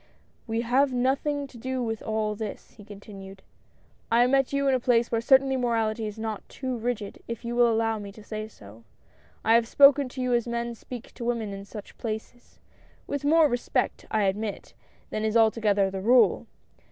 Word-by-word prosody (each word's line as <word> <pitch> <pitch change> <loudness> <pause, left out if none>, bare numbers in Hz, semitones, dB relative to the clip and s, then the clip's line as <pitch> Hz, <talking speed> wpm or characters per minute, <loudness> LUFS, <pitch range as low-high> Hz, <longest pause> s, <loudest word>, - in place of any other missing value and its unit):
"We 225 0 -1
have 260 +4 +2
nothing 275 +3 0
to 255 -3 -13
do 260 +1 -3
with 225 -2 -3
all 215 -1 -1
this," 210 -1 -7
he 210 - -15
continued. 195 -2 -11 0.4
" - - -36
I 235 +1 +5
met 270 +1 +2
you 280 0 0
in 270 - +3
a 255 - +2
place 240 -1 +2
where 230 - +1
certainly 265 +2 +4
morality 225 -3 0
is 210 +1 -7
not 220 -2 -4
too 260 -2 -4
rigid, 230 -3 -4
if 230 0 -6
you 235 0 -3
will 240 -1 +4
allow 225 -1 0
me 200 -1 -8
to 215 - -13
say 215 0 -5
so. 110 - -15 0.6
I 225 - +5
have 230 0 +4
spoken 280 +1 +6
to 260 +1 -6
you 250 -1 0
as 240 0 +1
men 235 0 -2
speak 245 +1 -10
to 240 - -8
women 230 -4 -2
in 195 0 -8
such 205 0 -11
places 225 +2 -7 0.3
— - - -31
with 285 0 -2
more 315 +2 +5
respect, 245 -3 -2
I 215 -1 +1
admit, 200 +2 -3 0.4
than 215 - -2
is 220 +1 +2
altogether 215 -3 +3
the 190 0 -4
rule. 245 +5 +4
230 Hz, 200 wpm, -26 LUFS, 215-250 Hz, 0.6 s, spoken